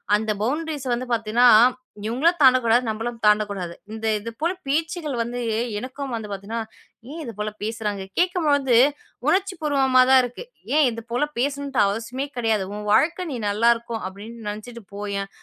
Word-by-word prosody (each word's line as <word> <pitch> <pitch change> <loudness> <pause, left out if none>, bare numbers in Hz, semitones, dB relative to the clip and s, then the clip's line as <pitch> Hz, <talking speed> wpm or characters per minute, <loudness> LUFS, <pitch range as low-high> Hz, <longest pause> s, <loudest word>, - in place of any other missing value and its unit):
அந்த 215 +1 0
பவுண்ட்ரீஸ 295 +4 -2
வந்து 245 +2 -2
பாத்தீங்கன்னா, 230 +1 +2 0.6
இவுங்களும் 295 +11 +1
தாண்டக் 255 -2 +6
கூடாது. 235 +2 +3
நம்மளும் 230 +2 -3
தாண்டக் 210 0 +4
கூடாது. 180 -4 -5 0.2
இந்த 220 0 -6
இதுபோலப் 310 - -4
பேச்சுகள் 315 0 -1
வந்து 240 +1 -3 0.4
எனக்கும் 260 +2 -6
வந்து 220 -2 -6
பாத்தீங்கன்னா, 200 +4 -4 0.5
ஏன் 330 - -6
இதுபோலப் 215 -3 -6
பேசுறாங்க? 210 -2 -3
கேட்கும் 355 -3 +1
போது 270 -4 +3 0.5
உணர்ச்சி 380 +4 +2
பூர்வமா 270 -4 +3
தான் 265 -1 +7
இருக்கு. 245 - -6 0.3
ஏன் 305 -2 +5
இதுபோலப் 240 +6 -3
பேசணுன்டு 280 -1 -1
அவசியமே 230 +6 -3
கிடையாது. 225 -4 +1
உன் 210 0 -6
வாழ்க்கை 335 - +2
நீ 260 - -3
நல்லா 220 +3 +3
இருக்கும் 230 -1 -6
அப்பிடின்னு 210 +3 -9
நினைச்சுட்டு 225 +2 -8
போய்யேன். 200 -1 -4
235 Hz, 150 wpm, -23 LUFS, 215-280 Hz, 0.6 s, தான்